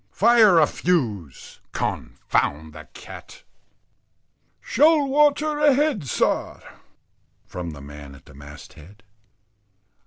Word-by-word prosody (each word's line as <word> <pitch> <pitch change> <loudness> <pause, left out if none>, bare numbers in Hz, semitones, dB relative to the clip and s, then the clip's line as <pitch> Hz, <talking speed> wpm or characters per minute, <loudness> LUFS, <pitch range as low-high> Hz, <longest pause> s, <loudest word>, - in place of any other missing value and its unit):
Fire 220 - +4
a 160 - +6
fuse 110 - -3
_con_found 80 +2 -3
the - - -12
cat." - - -13 1.2
"Shoal 300 +2 +2
water 295 +2 +1
ahead, 290 - +1
sir," - - -1 0.9
from 90 -1 -7
the 75 -3 -10
man 70 -1 -12
at 70 - -19
the - - -17
mast 70 +1 -13
head. 95 +9 -17
140 Hz, 100 wpm, -22 LUFS, -, 1.2 s, a